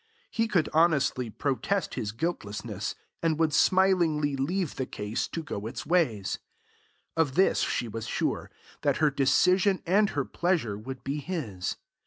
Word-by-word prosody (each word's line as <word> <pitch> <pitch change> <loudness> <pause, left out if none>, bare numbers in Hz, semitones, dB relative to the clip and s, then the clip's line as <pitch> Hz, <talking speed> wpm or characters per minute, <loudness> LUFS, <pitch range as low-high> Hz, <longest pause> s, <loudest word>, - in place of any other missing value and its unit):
He 225 0 +1
could 185 -7 +2
honestly 145 -7 +3
protest 145 - -1
his 105 - -3
guiltlessness, 105 - -3 0.3
and 160 -2 +1
would 160 -2 +2
smilingly 170 -7 +3
leave 165 +5 -1
the 130 - -2
case 105 +2 -3
to 165 - -5
go 105 -7 -5
its 120 +1 -6
ways. 135 - +1 0.8
Of 160 -5 +1
this 190 +2 +4
she 120 - 0
was 115 0 -5
sure, - - -1 0.3
that - - +2
her 155 -2 +3
decision 180 +8 +3
and 200 +4 +4
her 140 -2 -1
pleasure 170 - 0
would 125 +5 -7
be 140 +2 -2
his. 140 - -3
150 Hz, 150 wpm, -28 LUFS, 115-175 Hz, 0.8 s, this